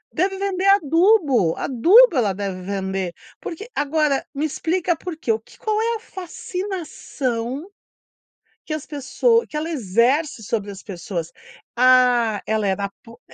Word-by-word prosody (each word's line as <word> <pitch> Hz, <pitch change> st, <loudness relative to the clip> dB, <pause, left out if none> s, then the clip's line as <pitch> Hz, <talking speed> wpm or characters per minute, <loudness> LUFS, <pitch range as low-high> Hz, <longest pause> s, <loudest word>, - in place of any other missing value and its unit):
deve 385 Hz, +1 st, 0 dB
vender 390 Hz, -1 st, -1 dB
adubo, 320 Hz, -, +3 dB
adubo 345 Hz, -, +5 dB
ela 215 Hz, -6 st, +2 dB
deve 190 Hz, -1 st, -4 dB
vender, 190 Hz, -1 st, -3 dB, 0.3 s
porque 420 Hz, +8 st, -7 dB
agora 295 Hz, -1 st, +1 dB
me 290 Hz, +3 st, -1 dB
explica 340 Hz, +3 st, -1 dB
por 350 Hz, -2 st, -7 dB
quê, 235 Hz, -, -1 dB
o 220 Hz, -, 0 dB
que -, -, -20 dB
qual 430 Hz, -1 st, -1 dB
é 465 Hz, 0 st, 0 dB
a -, -, -5 dB
fascinação 340 Hz, -, -5 dB, 1.0 s
que 310 Hz, -, -4 dB
as 310 Hz, -, -4 dB
pessoa 305 Hz, -, +1 dB
que -, -, -11 dB
ela 315 Hz, +2 st, -3 dB
exerce 250 Hz, -, +1 dB
sobre 205 Hz, -1 st, -3 dB
as 195 Hz, 0 st, -10 dB
pessoas? 175 Hz, -4 st, -5 dB, 0.4 s
"Ah, 245 Hz, -3 st, +4 dB
ela 215 Hz, -2 st, 0 dB
é 190 Hz, -, +2 dB
uma 200 Hz, 0 st, -3 dB
pu" 230 Hz, 0 st, -15 dB
275 Hz, 150 wpm, -22 LUFS, 215-355 Hz, 1.0 s, adubo